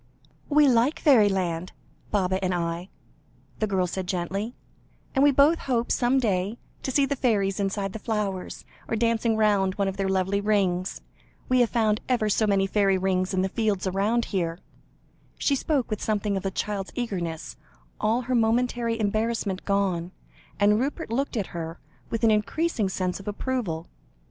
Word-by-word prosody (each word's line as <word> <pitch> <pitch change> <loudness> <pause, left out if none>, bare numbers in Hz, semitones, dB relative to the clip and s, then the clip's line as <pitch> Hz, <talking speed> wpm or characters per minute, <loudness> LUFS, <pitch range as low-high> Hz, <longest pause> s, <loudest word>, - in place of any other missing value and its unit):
"We 295 0 +5
like 250 +4 +3
fairyland 190 - +3 0.4
Baba 190 -2 0
and 185 -1 +1
I," 170 +2 -3 0.7
the 215 - +1
girl 190 -2 +1
said 180 +1 -4
gently, 195 +5 -2 0.6
"and 270 - +3
we 290 - +7
both 285 +4 +4
hope, 240 -3 -1
some 250 +2 +2
day, 205 -3 0 0.2
to - - -3
see 275 +2 +3
the 280 - -1
fairies 205 -7 +1
inside 195 0 -1
the 220 - -5
flowers, 205 -4 -3 0.2
or - - -1
dancing 230 0 +1
round 200 -3 +2
one 200 -1 0
of 195 0 -3
their 195 -1 0
lovely 190 +1 +1
rings. 195 -3 0 0.5
We 255 0 +4
have 240 -2 +4
found 220 -2 +1
ever 235 -4 +2
so 215 +1 +2
many 195 -1 +3
fairy 195 -1 +2
rings 185 0 0
in 185 -1 +1
the - - +1
fields 210 -3 0
round 205 +5 +1
here." 170 -3 0 0.8
She 280 - +2
spoke 275 -4 -1
with 215 - -2
something 210 -1 0
of 195 0 -2
a - - +1
child's 195 0 -3
eagerness, 170 - -3 0.4
all 225 +3 +1
her 255 +1 -3
momentary 235 0 +1
embarrassment 215 -2 -1
gone, 190 -3 0 0.5
and 210 +1 +4
Rupert 285 +2 -3
looked 265 +1 -1
at 205 - 0
her, 165 0 -5 0.3
with 230 0 -3
an 225 - +6
increasing 215 - 0
sense 185 -1 -2
of 195 - -12
approval. 205 -7 -2
205 Hz, 170 wpm, -26 LUFS, 190-235 Hz, 0.8 s, we